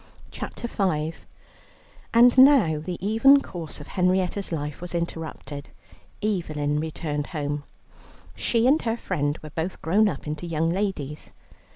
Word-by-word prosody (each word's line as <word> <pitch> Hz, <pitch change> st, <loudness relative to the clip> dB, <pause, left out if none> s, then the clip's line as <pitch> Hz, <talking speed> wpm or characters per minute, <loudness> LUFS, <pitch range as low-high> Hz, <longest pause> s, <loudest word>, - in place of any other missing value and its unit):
CHAPTER 235 Hz, -, -6 dB
V 165 Hz, -8 st, 0 dB, 1.0 s
And 240 Hz, +1 st, +6 dB
now 255 Hz, -, +6 dB
the 175 Hz, +3 st, -5 dB
even 250 Hz, +7 st, +6 dB
course 170 Hz, -, -7 dB
of 145 Hz, -, -11 dB
Henrietta's 185 Hz, +1 st, 0 dB
life 150 Hz, -2 st, -4 dB
was 175 Hz, 0 st, -4 dB
interrupted. 160 Hz, -4 st, -5 dB, 0.5 s
Evelyn 155 Hz, -8 st, -1 dB
returned 150 Hz, -2 st, -3 dB
home. 145 Hz, -2 st, -3 dB, 0.7 s
She 230 Hz, -1 st, +1 dB
and 285 Hz, +5 st, +4 dB
her 225 Hz, 0 st, -1 dB
friend 145 Hz, -8 st, -1 dB
were 155 Hz, -, -8 dB
both 165 Hz, +4 st, -3 dB
grown 205 Hz, +6 st, +4 dB
up -, -, -6 dB
into 155 Hz, +3 st, -4 dB
young 165 Hz, 0 st, 0 dB
ladies. 170 Hz, -7 st, -3 dB
170 Hz, 135 wpm, -25 LUFS, 150-205 Hz, 1.0 s, And